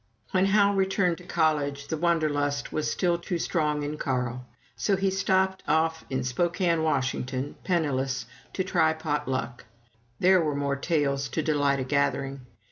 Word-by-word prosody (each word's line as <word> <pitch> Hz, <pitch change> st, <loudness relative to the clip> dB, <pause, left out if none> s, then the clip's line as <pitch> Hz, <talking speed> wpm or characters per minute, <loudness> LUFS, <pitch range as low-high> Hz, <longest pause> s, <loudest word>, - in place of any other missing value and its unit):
When 190 Hz, +1 st, +3 dB
Hal 200 Hz, 0 st, +4 dB
returned 190 Hz, -3 st, +1 dB
to -, -, -12 dB
college, 145 Hz, -4 st, 0 dB
the 160 Hz, -, 0 dB
Wanderlust 150 Hz, -4 st, 0 dB
was 155 Hz, -, 0 dB
still 175 Hz, -2 st, +1 dB
too 175 Hz, +1 st, -3 dB
strong 150 Hz, -3 st, 0 dB
in 150 Hz, +1 st, -4 dB
Carl; 125 Hz, -2 st, -2 dB, 0.3 s
so 200 Hz, -, +1 dB
he 195 Hz, 0 st, +1 dB
stopped 190 Hz, 0 st, +1 dB
off 160 Hz, 0 st, +1 dB
in 130 Hz, -1 st, -1 dB
Spokane, 170 Hz, +5 st, +1 dB
Washington, 130 Hz, -2 st, -1 dB
penniless, 135 Hz, -7 st, 0 dB, 0.3 s
to 185 Hz, -, -1 dB
try 160 Hz, -4 st, +2 dB
pot 160 Hz, -3 st, -2 dB
luck. 125 Hz, -1 st, -3 dB, 0.5 s
There 185 Hz, 0 st, +5 dB
were 150 Hz, -3 st, -1 dB
more 140 Hz, -1 st, 0 dB
tales 140 Hz, -3 st, 0 dB
to 160 Hz, -, -2 dB
delight 145 Hz, -3 st, +2 dB
a -, -, -1 dB
gathering. 140 Hz, 0 st, 0 dB
155 Hz, 155 wpm, -27 LUFS, 140-175 Hz, 0.5 s, There